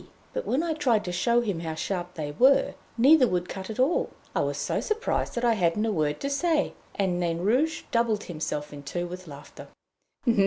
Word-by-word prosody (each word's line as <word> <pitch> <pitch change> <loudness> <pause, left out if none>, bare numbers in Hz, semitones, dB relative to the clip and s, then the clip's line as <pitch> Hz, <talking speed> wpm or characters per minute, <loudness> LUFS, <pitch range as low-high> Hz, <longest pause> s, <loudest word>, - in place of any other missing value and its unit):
But - - -3
when 275 +6 +1
I 335 -2 0
tried 245 -9 +1
to 180 - -3
show 235 +7 +2
him 200 -8 -2
how 160 -1 -4
sharp 180 +1 -3
they 150 -3 -4
were, 265 - +4 0.2
neither 265 +2 +6
would 180 -3 -1
cut 190 0 -6
at 220 - -5
all. 270 +7 +2 0.3
I - - +2
was - - 0
so - - -1
surprised 445 +2 -1
that 240 0 0
I 235 - +5
hadn't 195 +1 +1
a 225 - +1
word 155 -5 0
to 280 - -1
say, 310 +1 +1 0.2
and 185 -3 0
Nain 170 -2 0
Rouge 260 - +1
doubled 230 -3 +1
himself 150 -3 -4
in 145 - -8
two 175 +5 -3
with 180 +1 -8
laughter. 145 -1 -11
205 Hz, 205 wpm, -27 LUFS, 175-255 Hz, 0.3 s, neither